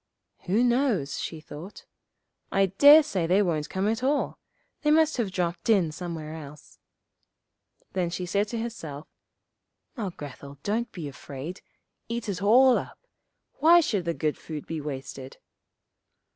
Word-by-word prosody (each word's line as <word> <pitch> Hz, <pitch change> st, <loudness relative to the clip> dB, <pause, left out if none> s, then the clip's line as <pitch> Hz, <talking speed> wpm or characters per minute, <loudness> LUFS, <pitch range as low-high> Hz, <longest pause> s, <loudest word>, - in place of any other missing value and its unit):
'Who 210 Hz, +7 st, +3 dB
knows,' 240 Hz, -, +1 dB
she 160 Hz, -, -5 dB
thought. 155 Hz, +5 st, -10 dB, 0.7 s
'I 195 Hz, 0 st, +4 dB
dare 295 Hz, +2 st, +10 dB
say 190 Hz, -, -1 dB
they 190 Hz, +4 st, +4 dB
won't 155 Hz, -5 st, -1 dB
come 190 Hz, +2 st, -1 dB
at 225 Hz, +2 st, 0 dB
all; 280 Hz, +3 st, 0 dB, 0.4 s
they 300 Hz, -, +1 dB
must 315 Hz, 0 st, +4 dB
have 230 Hz, -5 st, 0 dB
dropped 175 Hz, +2 st, -2 dB
in 190 Hz, -8 st, +4 dB
somewhere 160 Hz, -2 st, -6 dB
else.' 150 Hz, -2 st, -11 dB, 1.1 s
Then 180 Hz, -2 st, 0 dB
she 180 Hz, +1 st, -4 dB
said 200 Hz, +4 st, 0 dB
to 230 Hz, -, -4 dB
herself, 160 Hz, -11 st, -6 dB, 0.9 s
'Now, 215 Hz, -7 st, -3 dB
Grethel, 140 Hz, -3 st, -10 dB
don't 225 Hz, +4 st, -1 dB
be 170 Hz, -6 st, -6 dB
afraid, 140 Hz, +5 st, -8 dB, 0.5 s
eat 235 Hz, -1 st, -3 dB
it 195 Hz, -3 st, -3 dB
all 250 Hz, +5 st, +6 dB
up: -, -, -11 dB, 0.5 s
why 335 Hz, +3 st, +7 dB
should 210 Hz, -, 0 dB
the 170 Hz, -1 st, -1 dB
good 155 Hz, -2 st, -1 dB
food 155 Hz, -3 st, -7 dB
be 160 Hz, -2 st, -4 dB
wasted? 135 Hz, -2 st, -7 dB
185 Hz, 145 wpm, -27 LUFS, 155-235 Hz, 1.1 s, dare